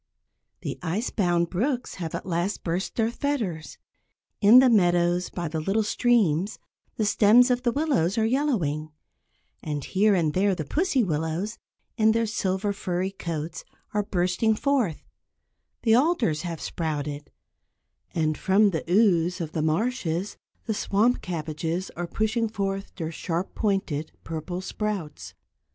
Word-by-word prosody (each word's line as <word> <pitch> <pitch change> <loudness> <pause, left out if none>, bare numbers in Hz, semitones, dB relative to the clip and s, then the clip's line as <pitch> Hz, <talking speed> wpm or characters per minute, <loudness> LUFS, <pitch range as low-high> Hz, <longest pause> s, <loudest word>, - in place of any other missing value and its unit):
The - - -5
ice 185 +7 -2
bound 175 -4 +1
brooks 245 +7 -1
have 165 -2 -3
at - - -5
last 175 +3 -2
burst 175 +3 -2
their 225 0 +1
fetters, 225 - -3 0.6
in 215 +4 +8
the 260 +1 +8
meadows 175 -5 +3
by 175 -2 -4
the 160 +1 -3
little 195 +7 +1
streams 210 -6 +2 0.4
the 215 - 0
stems 230 +5 +5
of 245 0 +1
the 245 -2 +1
willows 255 - +1
are 220 - +3
yellowing, 215 - 0 0.7
and 145 -3 -4
here 200 +1 +3
and 160 -4 +1
there 195 +1 +2
the 155 -4 -4
pussy 295 - +1
willows, 165 +5 -2 0.4
in 220 -1 +4
their 230 0 +1
silver, 200 -1 -1
furry 185 -1 -2
coats, 165 -4 -5 0.3
are 210 - +2
bursting 185 +3 +1
forth; 250 - 0 0.8
the 225 - +4
alders 250 - +2
have 170 -3 -5
sprouted, 150 -3 -4 0.9
and 155 -2 0
from 200 +2 +4
the 160 - -2
ooze 180 -3 +3
of 160 -3 -4
the 160 - -2
marshes 175 +1 -1 0.3
the 220 - -1
swamp 215 +4 +1
cabbages 165 +1 -3
are 175 0 -3
pushing 220 +4 0
forth 195 -2 -3
their 165 -3 -4
sharp 170 +2 -3
pointed 190 -8 -1
purple 165 +3 -5
sprouts. 165 - -4
190 Hz, 140 wpm, -26 LUFS, 165-220 Hz, 0.9 s, in